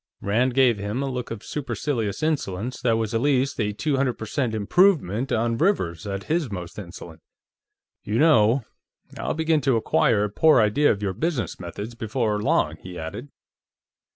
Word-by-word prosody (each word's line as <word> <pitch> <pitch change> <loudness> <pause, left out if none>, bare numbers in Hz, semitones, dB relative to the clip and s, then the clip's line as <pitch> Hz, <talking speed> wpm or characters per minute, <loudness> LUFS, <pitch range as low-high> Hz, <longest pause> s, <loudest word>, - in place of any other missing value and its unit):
Rand 120 +5 0
gave 125 -5 +4
him 105 +7 -3
a 135 - -2
look 125 -1 -4
of 115 -2 -7
supercilious 120 -3 -3
insolence 125 -7 -2
that 115 -2 +2
was 110 -1 -2
at 115 - +1
least 140 -1 +1
a 105 -1 0
two 140 +7 -1
hundred 130 -2 +1
per 110 - -7
cent 115 0 -1
improvement 130 - +2
on 115 +1 0
Rivers 95 - 0
at 100 0 -4
his 160 -4 -1
most 90 0 -6
insolent. 85 -3 -10 0.8
"You 105 - -2
know, 125 -5 +4 0.5
I'll - - -3
begin 160 -1 +1
to 135 -4 +2
acquire 110 -1 +2
a 105 - -1
poor 155 +4 +5
idea 115 +7 +3
of 105 0 -3
your 95 -2 -1
business 135 - -2
methods 100 +6 -7
before 110 -2 -1
long," - - +1
he 90 -1 -10
added. 100 - -7
115 Hz, 175 wpm, -24 LUFS, 105-140 Hz, 0.8 s, poor